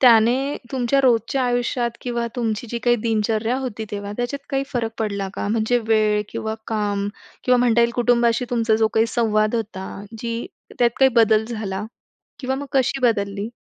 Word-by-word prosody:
त्याने 250 +3 +5 0.2
तुमच्या 260 +1 +2
रोजच्या 255 +1 +2
आयुष्यात 245 0 0
किंवा 235 -1 -2
तुमची 225 -1 -1
जी 235 - -2
काही 240 0 +4
दिनचर्या 225 +2 +1
होती 225 -4 -4
तेव्हा, 205 0 -5
त्याच्यात 275 +4 -4
काही 270 -1 +1
फरक 235 -4 -1
पडला 200 -3 -2
का? - - -3
म्हणजे 225 +3 +2
वेळ 215 -1 +3
किंवा 220 0 -3
काम 205 -2 -1 0.4
किंवा 250 0 +4
म्हणता 240 -1 +3
येईल 235 0 +4
कुटुंबाशी 240 0 +2
तुमचा 230 -2 +2
जो 220 0 +3
काही 225 +1 +4
संवाद 215 -2 +1
होता. 205 -4 -3 0.3
जी 230 0 -3 0.3
त्यात 240 -1 +4
काही 265 -1 +6
बदल 220 -1 +5
झाला 210 -3 -4 0.6
किंवा 265 0 -1
मग 285 - -5
कशी 270 0 +1
बदलली? 200 -3 0
230 Hz, 165 wpm, -22 LUFS, 215-245 Hz, 0.6 s, काही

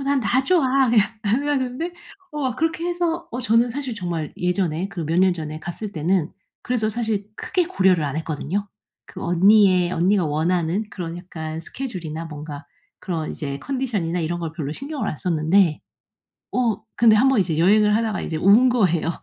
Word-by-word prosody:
"어 - - -4
난 275 0 +1
다 250 +3 +2
좋아." 270 -5 +3
그냥 215 -4 +5 0.2
언니가 280 +7 +1
그러는데 260 +7 -3 0.4
어 265 -5 -2
그렇게 325 +2 -1
해서 345 -1 -2
어 245 - -4
저는 230 +1 +3
사실 265 -1 -4
정말 170 -6 -4
예전에 180 -1 -1
그 175 -4 -5
몇 160 +2 -1
년 185 0 +5
전에 155 -2 -6
갔을 200 +5 -6
때는 170 +1 0 0.3
그래서 230 -3 0
사실 220 -3 -2
크게 365 -3 -1
고려를 190 - +2
안 145 -1 -2
했거든요. 160 +5 -3 0.4
그 - - -9
언니의 185 0 +4
언니가 185 +2 +2
원하는 165 +5 0
그런 170 -3 -6
약간 160 -3 -6
스케줄이나 165 - -6
뭔가 150 -1 -8 0.3
그런 165 -4 -3
이제 140 -2 -5
컨디션이나 220 - -2
이런 175 +1 -2
걸 165 -2 -3
별로 150 -4 -4
신경을 280 - -4
안 - - -3
썼는데 165 +1 +2 0.7
어 230 -4 0
근데 230 -2 +6
한 240 +5 +4
번 265 -3 +3
이제 165 -4 0
여행을 210 +4 +4
하다가 220 -2 0
이제 160 - -3
운 205 +9 +5
거예요. 180 -10 +2
195 Hz, 360 characters per minute, -22 LUFS, 165-245 Hz, 0.7 s, 근데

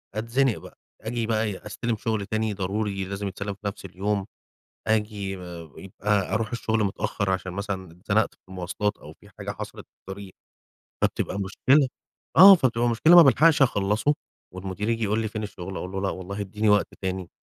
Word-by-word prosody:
أتزنق 115 +2 +1
بقى. - - -13 0.2
آجي 115 +1 -2
بقى 110 -1 +1
إيه، 105 -2 -4
أستلَم 115 +1 -2
شُغل 110 -2 -2
تاني 110 0 -1
ضروري 100 +1 -2
لازم 100 +1 -4
يتسلّم 100 +1 -4
في 100 - -18
نفس 100 - -6
اليوم. 95 +2 -2 0.6
آجي 105 -3 -1
ب - - -10 0.4
يبقي 100 +1 -1
أرُوح 110 -1 -1
الشغل 110 -2 0
متأخّر 100 0 -1
عشان 95 -1 -2
مثلًا 95 -2 -4
اتزنَقت 100 +4 0
في - - -37
المواصلات 95 +3 -2
أو - - -12
في - - -17
حاجة - - -5
حصَلِت - - -7
في - - -73
الطريق، 95 0 -9 0.7
فبتبقي 100 - 0
مشكلة، 130 +8 +3 0.5
آه 195 +3 +11
فبتبقى 120 -6 +1
مشكلة، 155 +10 +6
ما 170 - +12
بالحقش 150 +1 +5
أخلّصه 110 +4 +2 0.4
والمدير 95 +3 -4
ييجي 115 -1 0
يقول 105 +2 +1
لي 110 - -1
فين 110 0 -5
الشغل، 95 -2 -6
أقول 90 +1 -5
له 95 - -2
لا 95 - 0
والله 100 +2 -6
ادّيني 105 +2 -1
وقت 105 0 +4
تاني، 95 -1 -3
105 Hz, 180 wpm, -25 LUFS, 95-110 Hz, 0.7 s, ما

